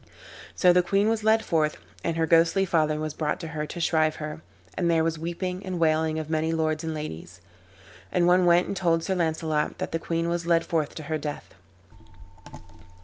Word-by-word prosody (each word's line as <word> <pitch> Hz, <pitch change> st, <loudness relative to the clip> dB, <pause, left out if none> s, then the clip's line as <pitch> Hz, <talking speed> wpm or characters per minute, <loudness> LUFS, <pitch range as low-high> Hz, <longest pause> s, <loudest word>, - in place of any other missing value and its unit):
So 180 Hz, -1 st, +5 dB
the 180 Hz, -, +5 dB
queen 200 Hz, +4 st, +1 dB
was 225 Hz, -1 st, -1 dB
led 220 Hz, +1 st, +3 dB
forth, 155 Hz, -2 st, +1 dB, 0.3 s
and 165 Hz, -, -1 dB
her 165 Hz, -, +2 dB
ghostly 170 Hz, +4 st, +3 dB
father 155 Hz, -4 st, +1 dB
was 155 Hz, -1 st, -3 dB
brought 150 Hz, -1 st, -2 dB
to 165 Hz, -, -6 dB
her 150 Hz, -1 st, -4 dB
to 175 Hz, -, -7 dB
shrive 155 Hz, -2 st, +2 dB
her, 150 Hz, 0 st, -6 dB, 0.3 s
and 175 Hz, -2 st, 0 dB
there 165 Hz, -1 st, +3 dB
was 165 Hz, -1 st, -1 dB
weeping 180 Hz, +3 st, -4 dB
and 185 Hz, -1 st, -4 dB
wailing 160 Hz, -1 st, +2 dB
of 155 Hz, -1 st, -4 dB
many 160 Hz, 0 st, 0 dB
lords 155 Hz, 0 st, -1 dB
and 160 Hz, -1 st, -3 dB
ladies. 150 Hz, -, -7 dB, 0.7 s
And 175 Hz, -1 st, +2 dB
one 180 Hz, 0 st, +4 dB
went 175 Hz, +1 st, +5 dB
and -, -, -4 dB
told 170 Hz, -3 st, +1 dB
Sir 190 Hz, -, -1 dB
Launcelot 160 Hz, -3 st, -1 dB
that -, -, -4 dB
the 165 Hz, -, -1 dB
queen 165 Hz, 0 st, -2 dB
was 170 Hz, 0 st, -2 dB
led 170 Hz, -1 st, +3 dB
forth 155 Hz, -3 st, -1 dB
to 155 Hz, -, -7 dB
her 155 Hz, +1 st, -3 dB
death. 150 Hz, 0 st, -6 dB
165 Hz, 200 wpm, -26 LUFS, 155-175 Hz, 0.7 s, So